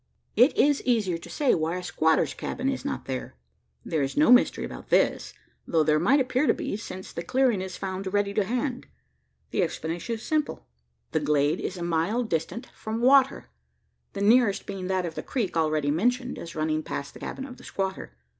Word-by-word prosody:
It 250 +6 +5
is 290 -1 +4
easier 210 -9 +1
to - - -11
say 290 -4 +2
why 165 +2 0
a 180 - -6
squatter's 160 -2 +2
cabin 260 +2 -3
is 265 -2 -3
not 285 - -4
there. 130 - -5 0.5
There 155 - 0
is 135 0 -2
no 300 -3 +5
mystery 250 - +5
about - - -9
this: - - +2 0.3
though 160 -2 +3
there 155 0 +3
might 280 - +4
appear 255 +2 +1
to - - +4
be, - - -3
since 190 -3 -8
the - - -4
clearing 245 +1 +2
is 185 -1 -6
found 190 0 -4
ready 205 0 +1
to 205 - +2
hand. 250 +4 -2 0.6
The - - +1
explanation 170 +5 -2
is 220 - -10
simple: 310 -1 -1 0.5
the 160 - +1
glade 150 +2 +1
is 185 - -4
a 175 - -4
mile 175 +8 0
distant 225 - -3
from 220 +1 -4
water 265 +2 +4 0.6
the 200 - -4
nearest 215 -1 +4
being 195 -2 -5
that 185 -1 0
of 165 - -4
the - - -4
creek 225 -10 -2
already 155 -3 +1
mentioned 245 - 0
as 170 - -8
running 155 0 0
past 140 -2 -5
the - - -12
cabin 265 - -5
of 255 -2 -10
the - - -15
squatter. 190 - -4
195 Hz, 200 wpm, -26 LUFS, 165-250 Hz, 0.6 s, It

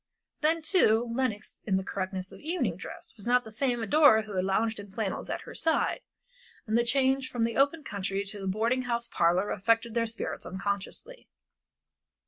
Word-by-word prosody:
Then, 320 +1 +1
too, 240 - +4
Lenox 235 -4 -2
in 190 -2 +3
the 190 - -2
correctness 185 -1 -4
of - - -11
evening 300 - -1
dress 180 - -9
was 205 - -8
not 250 +1 +4
the 220 - -10
same 240 0 0
adorer 225 -2 +6
who 210 -2 -8
had 185 - +1
lounged 220 +3 +1
in 205 0 -9
flannels 200 0 -3
at - - -3
her - - -10
side, 325 +9 +1 0.6
and 220 -1 -1
the 235 - +4
change 265 +1 +2
from 240 -2 -1
the 230 0 0
open 285 +3 +2
country 200 -3 -2
to 200 +1 -6
the 195 - -4
boarding 225 +6 +1
house 235 0 0
parlor 175 +4 +2
affected 230 +3 +1
their 230 -1 +1
spirits 225 - -4
unconsciously. 200 - -4
225 Hz, 185 wpm, -29 LUFS, 200-260 Hz, 0.6 s, adorer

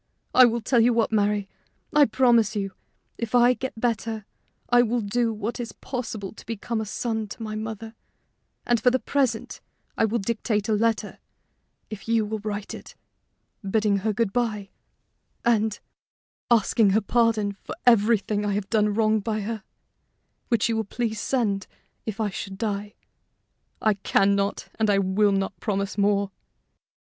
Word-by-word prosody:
I 255 - +8
will 235 0 +1
tell 240 +2 +2
you 235 +1 +5
what, 230 -1 +1
Mary: 205 -2 +1 0.5
I 300 -1 +7
promise 235 -5 +3
you, 195 -1 -2 0.5
if 230 0 -2
I 245 +1 +6
get 250 -1 -6
better, 225 -2 -1 0.4
I 245 0 +5
will 240 0 +1
do 230 +3 0
what 220 +2 -4
is 240 -1 -5
possible 225 -6 -5
to - - -13
be 225 -2 -4
a 220 -2 -1
son 220 0 -2
to 225 +3 -8
my 215 -1 -4
mother; 220 +1 -5 0.7
and 240 -2 +2
for 250 - +5
the 255 - +2
present 270 -1 -1 0.3
I - - +3
will 220 +2 0
dictate 215 -1 -1
a 220 - +2
letter, 220 0 0 0.7
if 215 0 -8
you 225 -1 +2
will 215 +1 -3
write 205 -1 -4
it, - - -10 0.7
bidding 210 0 +1
her 215 +3 0
good 210 -2 -1
by, 215 -5 -1 0.7
and 220 -3 +2 0.7
asking 225 -2 +4
her - - +2
pardon 225 -2 +2
for - - -6
everything 215 -2 +3
I 205 -1 0
have 200 0 -3
done 210 -2 +2
wrong 220 0 +3
by 215 +1 -2
her, 220 +1 -4 0.9
which 235 -4 +2
you 225 -1 0
will 220 - 0
please 220 0 -3
send 210 -7 0 0.4
if 220 0 -4
I 210 -2 0
should 195 +1 -6
die. 205 -1 -3 0.9
I 215 - +4
can 195 0 +2
not 200 0 -1
and 220 -1 +2
I 200 - +4
will 195 +2 +2
not 195 0 -1
promise 200 -3 -2
more." 200 -1 +1
220 Hz, 165 wpm, -25 LUFS, 205-230 Hz, 0.9 s, I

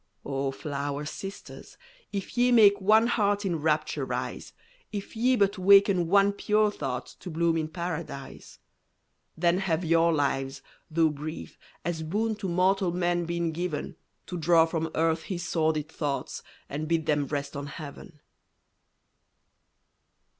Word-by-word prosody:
O 135 0 -1
flower 140 +1 -4
sisters, 195 +6 -8 0.3
if 200 +2 -5
ye 245 0 +3
make 205 -4 +6
One 215 +4 +5
heart 205 -3 +1
in 175 -3 0
rapture 155 0 0
rise; - - -4 0.4
If 205 +1 -6
ye 250 +3 +3
but 200 -3 +1
waken 195 -2 +5
one 200 +2 +5
pure 210 +1 +2
thought 125 -10 -4
To 185 - -8
bloom 165 0 +1
in 160 -1 -1
Paradise. 165 -4 -6 0.8
Then 170 +2 +2
have 175 -3 -1
your 165 +1 +4
lives, 135 -3 -1 0.3
though 160 0 +3
brief, 150 +2 -7 0.3
as 170 -2 -2
boon 210 +8 -1
To 195 -3 -4
mortal 185 +1 +2
man 175 0 0
been 170 0 -1
given, 160 -2 -4 0.3
To 180 - -5
draw 165 0 +5
from 165 -1 -2
earth 160 0 +1
his 175 0 -5
sordid 155 -2 0
thoughts 145 -3 -3 0.3
And 150 +2 -4
bid 165 -1 0
them 145 -2 +1
rest 145 0 -4
on 140 0 -5
Heaven! 150 +2 -10
170 Hz, 140 wpm, -27 LUFS, 155-195 Hz, 0.8 s, make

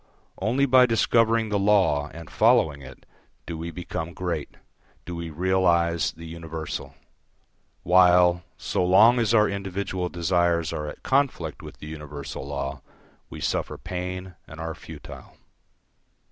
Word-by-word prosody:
Only 120 +8 +2
by 130 -1 +6
discovering 115 -1 +2
the 105 -1 0
law 95 -8 +3
and 85 -1 -10
following 75 -2 +3
it, 65 -1 -13 0.4
do 85 - -5
we 80 +1 -5
become 85 -1 -6
great, 85 -5 -4 0.5
do 90 - -6
we 85 -1 -5
realise 85 -1 +2
the 85 - -11
universal; 80 -1 -6 0.9
while, 90 -1 +5 0.2
so - - -1
long 105 +7 +6
as 115 -3 +1
our 105 -1 +5
individual 95 -2 -3
desires 85 -1 +1
are 75 - -4
at - - -9
conflict 130 - 0
with - - -11
the - - -10
universal 75 -3 -7
law, 70 -1 -4 0.5
we - - -9
suffer - - -2
pain 90 0 -5
and 80 - -11
are 80 0 -4
futile. - - -12
90 Hz, 135 wpm, -25 LUFS, 80-95 Hz, 0.9 s, by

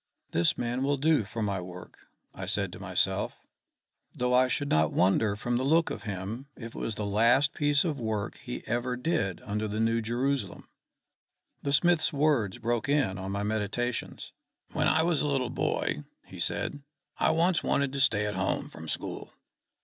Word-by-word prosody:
"This 85 0 +2
man 120 +2 -1
will 140 +1 +1
do 150 -3 +3
for 110 +2 -4
my 100 -3 -1
work," 90 0 -10 0.3
I - - -6
said - - -1
to - - -9
myself; - - 0 0.8
"though 125 0 0
I 130 +1 +5
should 145 +2 -1
not 80 0 +3
wonder 100 +3 +3
from 120 +3 -1
the 130 - 0
look 160 +4 +3
of - - -5
him 105 +8 -5
if 115 -1 -8
it - - -7
was 110 - -2
the 105 - -3
last 120 +8 +4
piece 145 -1 +3
of 150 -5 -1
work 110 -2 -2
he 125 -3 -7
ever 120 +2 -1
did 125 - -1
under 105 +1 -2
the 105 +1 -3
New 115 +1 +2
Jerusalem." 125 +5 -2 0.9
The 140 - -1
smith's 175 +3 +4
words 140 - +2
broke 120 +3 -1
in 135 -11 +2
on 95 +1 -4
my 100 +1 -2
meditations. 110 +3 -2 0.4
"When - - +1
I 160 - +4
was 165 -3 +2
a 150 - 0
little 135 -4 0
boy," 75 - -1 0.2
he - - -11
said, 145 - -2 0.4
"I - - +4
once 170 +1 +3
wanted 140 -1 +1
to 140 - -2
stay 105 -6 +3
at 105 - -1
home 95 0 -1
from 80 0 -9
school. - - -4
120 Hz, 185 wpm, -29 LUFS, 105-140 Hz, 0.9 s, I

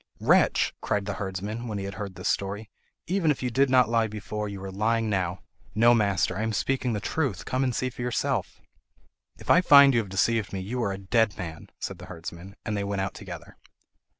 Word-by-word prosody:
"Wretch!" - - +3
cried 100 -1 -1
the 100 - -2
herdsman, 105 +5 -4
when 105 -2 -3
he 100 - -4
had 100 - -5
heard 100 -2 -6
this - - -4
story, 100 +2 -2 0.3
"even 180 -2 +1
if 140 -3 0
you 125 - -1
did 135 +3 +3
not 125 -2 +5
lie 115 -1 +2
before, 105 0 -5
you 100 -1 -7
are 95 - -5
lying 110 +2 0
now." 90 -2 -1 0.3
"No, 120 +2 +6
master, 100 -5 +1
I 100 - -2
am 110 0 -1
speaking 125 +1 0
the 105 - -1
truth. 110 - -2
Come 130 +1 0
and 125 -3 0
see 130 0 -1
for 120 - -9
yourself." 125 -5 -1 0.8
"If - - -2
I 180 - +7
find 140 -5 +8
you 120 - +4
have 105 -4 -4
deceived 100 +1 +1
me, 95 - -2
you 115 +7 -3
are 100 - 0
a 95 - -4
dead 105 +2 +1
man, 80 -4 -7
said 95 -3 -6
the 90 - -10
herdsman; 85 +2 -9
and 110 - -2
they 100 - -1
went 100 -1 -2
out 95 - -2
together. - - -10
105 Hz, 225 wpm, -27 LUFS, 95-120 Hz, 0.8 s, find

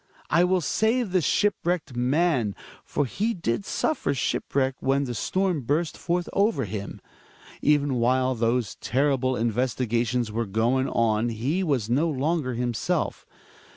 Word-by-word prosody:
I 170 - +5
will 185 0 +2
save 220 - +1
the 185 -1 +3
shipwrecked 175 -5 0
man. 130 - +1 0.3
For 145 - -1
he 215 - -1
did 165 - -2
suffer 315 - 0
shipwreck 135 +1 0
when 135 +1 +1
the 125 -3 -3
storm 185 - 0
burst 150 +6 -1
forth 175 0 -1
over 205 +3 +2
him. 100 -2 -6 0.6
Even 145 -2 +3
while 130 +2 +2
those 115 -2 0
terrible 130 0 +1
investiga 120 0 0
tions 120 -3 -1
were 115 +1 -2
going 120 +6 +1
on 115 0 +1
he 130 - -1
was 135 - 0
no 140 +8 +2
longer 145 -2 -1
himself. 120 -1 -2
130 Hz, 140 wpm, -25 LUFS, 120-170 Hz, 0.6 s, I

